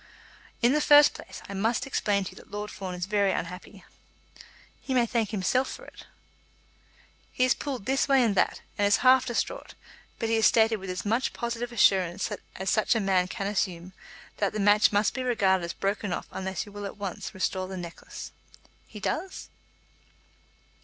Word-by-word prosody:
"In 240 +3 +5
the 300 - +2
first 295 0 +7
place, - - -10
I - - -7
must 225 +6 0
explain 205 -7 0
to 185 - -6
you - - -16
that - - -14
Lord 205 0 -5
Fawn 185 -2 -6
is 180 0 -3
very 200 -1 +2
unhappy." 180 +3 -6 1.0
"He 265 - -3
may 245 -2 +4
thank 230 -3 -1
himself 225 +6 0
for - - -9
it." - - -14 1.2
"He 255 - +2
is 255 - +4
pulled 260 -8 -5
this 270 +4 +1
way 270 -2 +4
and 225 -4 +2
that, 190 - +1 0.2
and 205 - +4
is 205 - +4
half 255 0 +6
distraught; 250 - -3 0.4
but 225 - -2
he 225 0 +2
has 220 - +5
stated 225 -1 +3
with 190 -1 -8
as 185 +2 -4
much 230 +5 0
positive 235 0 -4
assurance 190 -4 +2 0.2
as 190 +1 -3
such 215 +2 +2
a - - +2
man 190 -3 +2
can 195 +2 -5
assume, 185 -3 -2 0.4
that 200 -2 0
the 215 - -3
match 205 +1 +5
must 205 0 +2
be 260 - -3
regarded 195 -7 +2
as 170 - -4
broken 200 0 -2
off - - -3
unless 190 0 -4
you 205 - -13
will 205 0 -6
at - - -10
once 200 -2 -6
restore 185 0 -1
the 190 0 -6
necklace." 170 -2 -8 0.6
"He 210 - -10
does?" 340 - -4
205 Hz, 190 wpm, -27 LUFS, 190-235 Hz, 1.2 s, first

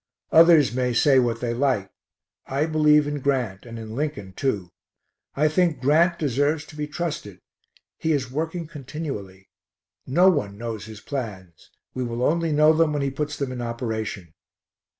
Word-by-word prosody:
Others 165 -5 +6
may 125 -1 0
say 135 +2 +5
what 120 -2 0
they 120 -1 -1
like, 120 -6 0 0.6
I 140 +3 0
believe 150 -2 +4
in 145 0 -3
Grant 125 -7 -1
and 115 0 -8
in 110 -1 -7
Lincoln, 135 -10 -4
too. 100 -8 -2 0.6
I 150 +2 +3
think 160 -2 +1
Grant 165 +6 +3
deserves 145 +2 0
to 150 - -14
be 150 -1 -3
trusted. 150 - -5 0.6
He 160 - 0
is 130 -5 -1
working 160 +4 -3
continually. 135 - -7 0.6
No 175 +8 +4
one 100 - -2
knows 115 -2 -5
his 110 -1 -10
plans; 100 - -7 0.2
we 130 - -3
will 120 0 -3
only 165 +3 +1
know 155 +1 +5
them 160 -1 +2
when 145 -1 -1
he 135 - -1
puts 150 +2 -3
them 140 -2 -3
in 125 -1 -5
operation. 110 -7 -4
135 Hz, 165 wpm, -24 LUFS, 115-150 Hz, 0.6 s, Others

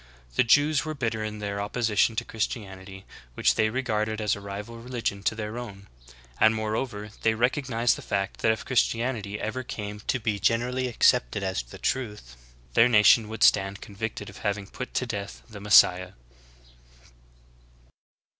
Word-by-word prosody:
The - - +4
Jews 145 +5 +4
were 155 -1 -4
bitter 110 -5 -2
in 105 0 -4
their 100 -1 -3
opposition 110 +1 +1
to - - -2
Christianity, 95 -3 -5 0.3
which - - +3
they 110 0 +2
regarded 110 -3 -1
as 105 -2 +1
a 100 - -9
rival 105 +4 -7
religion 115 -4 -3
to 105 - 0
their 110 +1 -5
own; 100 -5 -9 0.5
and 110 0 +5
moreover, 110 -1 -3
they 110 0 +2
recognized 120 0 +1
the - - -8
fact 100 0 -2
that 110 - +3
if 110 - -4
Christianity 115 -4 0
ever 110 +4 -3
came 105 -4 -6
to 125 - +1
be 110 -3 -1
generally 125 +5 +1
ac 120 - -8
cepted 60 +12 +3
as 95 -7 -1
the - - -12
truth, 105 - -3 0.4
their 115 - +5
nation 105 0 +5
would 110 - -2
stand 100 0 +4
convicted 105 0 -6
of 100 - -11
having 100 -1 -2
put 130 +6 -8
to 125 - +1
death 100 -4 -6
the 105 -3 -10
M^essiah. 95 -3 +5
110 Hz, 165 wpm, -26 LUFS, 100-120 Hz, 0.5 s, and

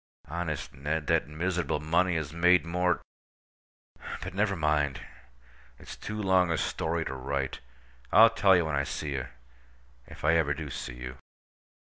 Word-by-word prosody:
Honest, 75 -4 -4
Ned, 75 +3 -2
that - - +2
miserable 85 0 -1
money 85 +3 +2
has 80 -2 -3
made 90 +1 +4
more—But, 90 +1 -5
never 100 +1 +1
mind. 75 -4 0 0.7
It's - - -10
too 105 0 -6
long 95 -3 +3
a 85 - +1
story 80 +1 -1
to - - -4
write. 70 0 -3 0.5
I'll 110 +3 +8
tell 100 -4 +5
you 85 -2 +3
when 80 -2 -1
I 70 - +1
see 75 +1 -4
you—if 65 -1 -10
I 80 - +5
ever 75 -3 +1
do 75 -3 -6
see - - -6
you. 65 +1 -8
80 Hz, 145 wpm, -29 LUFS, 70-90 Hz, 0.7 s, I'll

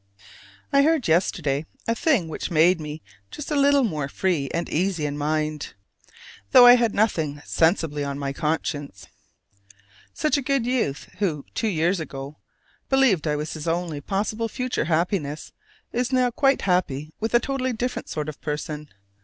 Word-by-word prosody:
I 280 - +6
heard 305 -4 +2
yesterday 160 -3 +1 0.2
a 230 - +2
thing 240 - +1
which 160 - -4
made 170 +1 +4
me 150 +1 -7 0.3
just 300 - -7
a - - +1
little 280 -1 +4
more 155 - -1
free 160 -5 -1
and 170 +1 -2
easy 170 -1 0
in 145 -1 -2
mind, 150 0 -2 0.8
though 245 - +10
I 245 - +11
had 235 -3 +2
nothing 160 -9 +1
sensibly 160 -3 +1
on 140 -1 -3
my 140 -1 -3
conscience. 145 -6 -3 1.1
Such 305 -1 +1
a - - -1
good 275 -2 0
youth 235 - -1
who 160 -9 -1
two 225 - -1
years 175 -1 +1
ago 140 -2 -7 0.5
believed 255 - +3
I 150 - +1
was 150 +1 -4
his 155 0 -6
only 165 -3 -2
possible 215 +6 -2
future 250 - -2
happiness, 160 -2 -1 0.4
is 245 +2 -1
now 255 -1 +2
quite 270 +3 +2
happy 155 -5 0
with 225 +2 -1
a - - +7
totally 260 0 -2
different 245 +2 -3
sort 150 -1 -3
of 155 - -7
person. 150 0 -4
170 Hz, 160 wpm, -24 LUFS, 150-240 Hz, 1.1 s, I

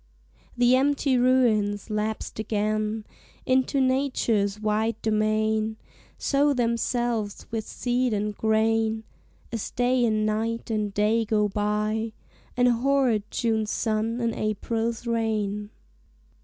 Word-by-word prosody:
The 245 +1 +5
empty 275 0 +2
ruins, 230 -5 +2
lapsed 215 +1 -3
again 215 0 -1 0.4
Into 260 +2 +2
Nature's 255 -6 +1
wide 215 +1 0
domain, 215 0 +1 0.4
Sow 285 +1 +2
themselves 235 -3 -1
with 225 -2 -3
seed 245 0 0
and 210 0 -1
grain 220 0 +1 0.5
As 230 -3 -3
Day 245 0 +1
and 215 -2 +2
Night 225 +2 -2
and 210 -2 -1
Day 210 +3 +2
go 210 -1 +1
by; 210 +2 -1 0.4
And 245 0 +4
hoard 245 -3 +2
June's 220 -2 0
sun 220 +2 -1
and 230 -1 0
April's 225 +2 -2
rain. 215 -3 -1
220 Hz, 110 wpm, -26 LUFS, 215-240 Hz, 0.5 s, The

